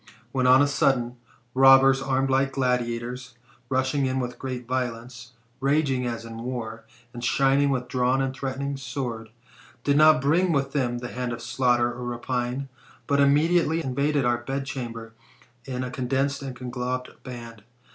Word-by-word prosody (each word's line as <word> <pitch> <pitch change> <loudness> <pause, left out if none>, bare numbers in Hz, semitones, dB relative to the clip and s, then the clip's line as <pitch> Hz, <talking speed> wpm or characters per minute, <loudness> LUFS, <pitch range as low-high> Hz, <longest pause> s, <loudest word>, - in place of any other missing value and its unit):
When, 130 -1 +1
on 130 +2 +7
a - - +2
sudden, 125 -3 +1 0.4
robbers 135 0 +6
armed 135 0 0
like 135 +1 +2
gladiators, 125 -1 -2 0.3
rushing 130 +1 +1
in 130 0 -1
with 125 -1 -4
great 125 -2 -5
violence, 125 -1 -4 0.3
raging 135 -2 +1
as 115 -1 -4
in 115 0 -8
war, 115 -2 -5 0.3
and 120 -1 -7
shining 135 +2 +3
with 125 -2 -1
drawn 125 0 +1
and 135 -1 -1
threatening 135 +1 -3
swords, 125 -4 -5 0.5
did 145 0 +2
not 155 -1 +7
bring 165 +7 +2
with 140 -2 0
them 125 -4 0
the 120 0 -6
hand 125 0 -3
of 120 - -7
slaughter 120 0 +1
or 125 - -7
rapine, 125 +2 -3 0.4
but 140 0 +1
immediately 160 +3 +3
invaded 140 +1 0
our 120 -1 +2
bedchamber, 120 -3 -5 0.5
in 130 -1 -3
a 125 - -5
condensed 135 +3 -1
and 135 -2 -6
conglobed 125 0 -4
band. 115 -4 -9
130 Hz, 155 wpm, -25 LUFS, 120-135 Hz, 0.5 s, on